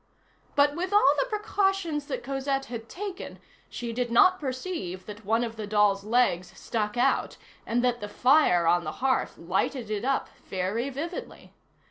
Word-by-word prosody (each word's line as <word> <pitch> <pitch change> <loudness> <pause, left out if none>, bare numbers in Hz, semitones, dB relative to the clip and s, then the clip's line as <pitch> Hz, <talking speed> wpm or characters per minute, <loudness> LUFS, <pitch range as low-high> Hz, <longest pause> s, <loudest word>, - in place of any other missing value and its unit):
But 290 0 +4
with 365 +3 -3
all 405 -9 +6
the - - +1
precautions 390 -8 0
that - - -4
Cosette 270 0 -2
had 230 -2 -7
taken 390 0 -6 0.3
she 235 -1 -5
did 245 0 -1
not 370 +11 +5
perceive 255 - -4
that 210 0 -10
one 225 +3 +2
of 230 -1 -5
the 215 -2 -5
doll's 205 -1 +3
legs 215 -5 +1
stuck 210 0 -2
out 260 +3 +1 0.3
and 240 +1 +1
that 245 -2 +1
the 205 - -5
fire 250 - +4
on 175 +1 +3
the - - -4
hearth 260 -1 +1
lighted 210 +7 -2
it 210 0 -2
up 270 +1 0 0.2
very 195 +8 -2
vividly. 315 +6 -7
245 Hz, 165 wpm, -27 LUFS, 210-290 Hz, 0.3 s, all